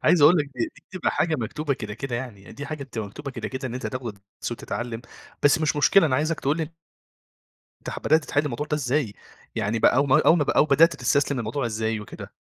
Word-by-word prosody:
عايز 175 - +4
أقول 155 +5 +8
لك 150 - +2
دي 120 - 0
دي 155 - -19
بتبقى 185 -2 -1
حاجة 165 - +1
مكتوبة 140 +4 -2
كده، 105 -4 -6
كده 125 +1 -4
يعني. 120 -6 -8
دي 140 - -7
حاجة 155 -2 -5
بتبقى 115 -5 -5
مكتوبة 140 +7 -7
كده، - - -5
كده 130 0 -4
إن 120 - -6
أنت 130 - -4
تاخد 120 -6 -5 0.2
تسو 120 - -3
تتعلّم، 120 0 -5 0.4
بس 145 0 +5
مش 155 -1 +1
مشكلة 160 +5 +5
أنا 130 -4 +1
عايزك 155 +3 0
تقول 140 +3 +1
لي 160 -1 -3 1.1
تح - - -4
بدأت 155 0 +3
تتحل 145 +1 0
الموضوع 145 +1 -3
ده 150 - 0
إزاي؟ 135 -4 0 0.4
يعني 110 +3 0
بقى 115 - +4
أو 140 +2 +3
ما 135 - +5
أو 165 - +8
ما 145 - +2
بقى - - -1
أو - - +6
بدأت 155 +3 +5
تستسلم 140 +2 +1
الموضوع 120 +3 -2
إزاي 110 -1 -1
وكده؟ 105 - -9
135 Hz, 230 wpm, -25 LUFS, 120-150 Hz, 1.1 s, أقول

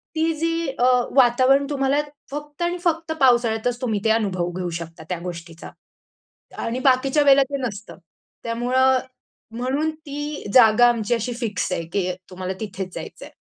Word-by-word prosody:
ती 320 +1 +1
जी 330 0 -1
अ, 245 - +4 0.3
वातावरण 260 +2 +4
तुम्हाला 280 0 +1 0.3
फक्त 295 +2 -7
आणि 345 +1 0
फक्त 330 -2 0
पावसाळ्यातच 240 -1 +2
तुम्ही 220 -5 -1
ते 220 - +3
अनुभव 185 -6 0
घेऊ 180 -1 -3
शकता 165 -1 -9
त्या 180 - -2
गोष्टीचा 170 -1 -8 0.9
आणि 240 +3 -2
बाकीच्या 270 +3 +3
वेळेला 275 -1 +6
ते 280 - -1
नसतं. 210 0 -9 0.5
त्यामुळं 255 +3 +2 0.6
म्हणून 270 +5 0
ती 295 -1 -6
जागा 240 -1 +7
आमची 235 -1 0
अशी 235 +2 -3
फिक्स 225 -6 -3
आहे 170 - -1
की 185 -2 0 0.2
तुम्हाला 185 +1 -4
तिथेच 190 -3 -6
जायचंय. - - -8
245 Hz, 145 wpm, -22 LUFS, 210-280 Hz, 0.9 s, जागा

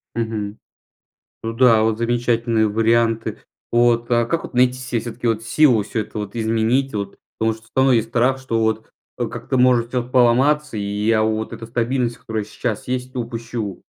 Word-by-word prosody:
Мгм. 110 -2 -3 0.9
Ну 115 0 -3
да, 115 -2 +5
вот 110 -1 +1
замечательные 115 -1 +1
варианты. 115 +1 +1 0.3
Вот. 120 0 +3
А 120 0 +3
как 165 +8 -1
вот - - -9
найти 125 0 +4
се 130 -2 -3
всё-таки 120 +1 -4
вот 115 -1 0
силу 115 -1 +4
всё 110 +2 -3
это 110 - -8
вот 105 0 -6
изменить, 115 +4 +1
вот? 100 -1 -4 0.2
Потому 110 0 +1
что 110 0 -15
всё 115 - -24
равно 130 0 +4
есть 115 -2 +2
страх, 125 +3 +2
что 125 -4 -2
вот, 110 0 -1 0.3
э, 120 - 0
как-то 120 +3 -3
может 125 -2 +3
всё 125 -1 -2
поломаться 130 +2 +3
и - - -2
я 105 +2 +1
вот 110 +1 -1
эта 115 0 -7
стабильность, 120 +1 -1
которая 110 -1 -4
сейчас 110 +2 -4
есть, 130 0 -3
упущу. 115 -4 -5
115 Hz, 180 wpm, -20 LUFS, 110-125 Hz, 0.9 s, да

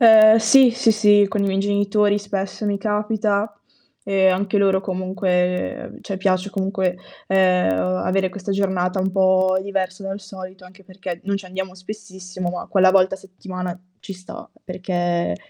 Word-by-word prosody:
Ehm, 220 -1 +8
sì, 245 +4 +6
sì, 235 -1 +2
sì, 205 -1 +4
con 205 +1 -2
i 200 - +1
miei 190 0 -1
genitori, 205 +1 +1
spesso, 200 +1 -4
mi 200 -1 0
capita 210 0 -1 0.5
e 195 -1 +2
anche 195 +2 +1
loro 195 -1 +3
comunque 185 -1 -2
cioè 195 - -5
piace 190 0 0
comunque, 190 -2 -1 0.3
ehm, 185 - +3
avere 95 - 0
questa 200 +1 -6
giornata 190 -1 0
un 190 +1 -1
po' 185 0 +3
diversa 195 0 -3
dal 195 +1 -5
solito. 190 -1 -11
Anche 190 +2 -17
perché 185 -2 -7
non 200 0 -1
ci 195 -1 -6
andiamo 190 0 -5
spessissimo, 185 -2 -7
ma 180 - -6
quella 190 -2 +4
volta 190 0 +3
a - - -14
settimana 185 -1 -7 0.2
ci 195 - -8
sta, 185 0 -11 0.2
perché 175 - -2
190 Hz, 160 wpm, -21 LUFS, 185-200 Hz, 0.5 s, Ehm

